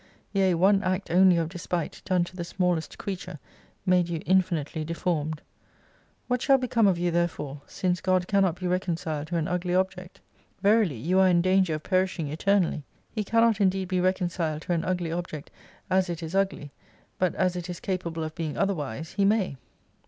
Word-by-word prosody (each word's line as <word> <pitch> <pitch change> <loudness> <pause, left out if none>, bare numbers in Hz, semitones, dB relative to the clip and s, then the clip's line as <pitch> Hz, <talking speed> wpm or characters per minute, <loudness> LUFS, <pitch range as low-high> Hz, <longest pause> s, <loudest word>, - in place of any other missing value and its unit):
Yea, 190 -3 +3
one 195 +3 +4
act 185 -1 -2
only 185 0 +6
of 165 -1 0
despite 175 -1 -4
done 185 -2 +2
to 175 - -8
the 175 - -4
smallest 175 -1 -1
creature 190 -5 -5 0.5
made 180 -2 +3
you 165 -2 -2
infinitely 170 -4 +1
deformed. 160 -1 -2 0.8
What 250 -1 0
shall 270 0 +5
become 240 -4 +2
of 185 -3 +3
you 175 0 0
there 170 +1 +2
fore 145 -4 -7
since 180 -1 -1
God 185 -1 +1
cannot 195 -4 +2
be 185 - -5
reconciled 170 -4 -2
to 170 +1 -2
an 160 -1 -1
ugly 180 0 -1
object? 185 -1 -2 0.4
Verily 205 - +3
you 175 +11 +1
are 190 - +6
in 175 -1 +3
danger 185 -3 +3
of 155 - -6
perishing 185 -4 0
eternally. 175 0 +1 0.3
He 215 - -2
can 230 +3 +2
not 225 -3 +3
indeed 190 -1 +1
be 185 -1 +1
reconciled 175 -4 -1
to 175 - -1
an 165 -1 0
ugly 175 -2 -1
object 170 -3 -5 0.4
as 185 0 +2
it 170 -1 -4
is 160 +1 -6
ugly, 195 -7 -1 0.5
but 185 -2 +1
as 185 -1 +1
it 180 0 -5
is 175 0 -5
capable 170 -4 -3
of 155 0 -5
being 160 -3 -4
otherwise 160 - -2
He 200 - 0
may. 195 -8 +2
180 Hz, 190 wpm, -27 LUFS, 165-190 Hz, 0.8 s, only